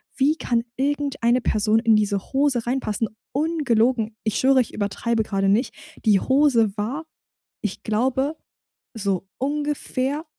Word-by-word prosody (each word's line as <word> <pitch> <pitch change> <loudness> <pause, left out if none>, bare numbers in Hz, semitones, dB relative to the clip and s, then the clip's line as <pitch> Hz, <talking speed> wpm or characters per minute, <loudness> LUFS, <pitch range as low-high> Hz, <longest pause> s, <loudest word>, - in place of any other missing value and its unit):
wie 290 +4 +3
kann 235 -6 0
irgendeine 275 -3 +1
Person 215 0 +2
in 225 -1 +4
diese 200 -2 -1
Hose 265 -4 +1
reinpassen? 230 -4 -1 0.2
Ungelogen. 250 -7 +1
Ich 215 -1 -1
schwöre, 265 0 +5
ich 235 - -4
übertreibe 220 +2 -1
grade 195 -2 0
nicht. 225 +6 +1 0.3
Die 205 -3 +5
Hose 250 -7 +3
war, 265 +10 -3 0.6
ich 210 -3 -4
glaube, 265 +7 0 0.6
so 195 -3 -2
ungefähr 290 +1 -2
240 Hz, 125 wpm, -23 LUFS, 215-275 Hz, 0.6 s, schwöre